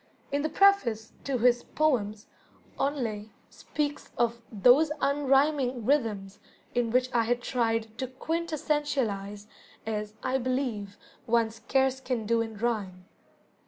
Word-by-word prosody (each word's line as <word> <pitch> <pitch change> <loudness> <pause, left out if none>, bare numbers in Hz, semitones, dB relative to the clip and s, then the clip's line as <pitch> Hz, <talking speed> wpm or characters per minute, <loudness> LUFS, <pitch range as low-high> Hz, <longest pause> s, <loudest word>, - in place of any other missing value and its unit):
In 285 +1 +1
the 310 - -1
preface 250 - +3
to 275 -2 0
his 240 0 +4
"Poems", 215 -9 0 0.5
Henley 235 -7 -2 0.2
speaks 295 -1 -4
of 235 0 0
"those 250 +9 +5
unrhyming 275 -3 +2
rhythms 210 -8 0 0.3
in 240 -1 +1
which 255 +2 +1
I 235 - +4
had 240 +1 0
tried 225 -3 -1
to 260 - -1
quintessentialize, 270 -9 -2 0.4
as 210 -1 -3
(I 265 +1 +1
believe) 245 -6 -2 0.3
one 230 -1 +2
scarce 265 +4 0
can 250 -4 -3
do 230 +1 +2
in 225 -2 -5
rhyme." 200 -5 -2
240 Hz, 125 wpm, -28 LUFS, 220-275 Hz, 0.5 s, those